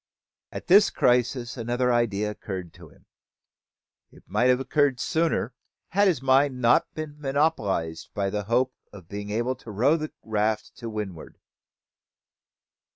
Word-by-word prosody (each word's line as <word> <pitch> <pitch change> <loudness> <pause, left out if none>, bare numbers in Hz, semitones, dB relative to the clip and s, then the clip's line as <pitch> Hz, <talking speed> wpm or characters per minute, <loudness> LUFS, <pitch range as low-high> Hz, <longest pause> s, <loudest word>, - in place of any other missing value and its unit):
At - - -7
this 200 +3 +6
crisis 125 0 +1
another 120 +1 0
idea 105 -3 0
occurred 95 -5 -7
to 85 -3 -14
him. - - -23 1.1
It - - -18
might 120 - +1
have 125 0 +4
occurred 140 -1 +1
sooner, 160 -5 0 0.4
had 200 +3 +3
his 155 -9 +1
mind 135 0 +3
not 120 -1 +3
been 150 -1 -6
monopolised 125 - -1
with 100 0 -1
the 105 -1 -2
hope 125 +4 +1 0.2
of 95 -5 -13
being 100 +1 -6
able 120 +4 0
to 120 - -13
row 125 +10 +2
the 155 -1 -5
raft 110 0 -1
to 115 - -6
windward. 105 -7 -6
120 Hz, 145 wpm, -26 LUFS, 105-135 Hz, 1.1 s, this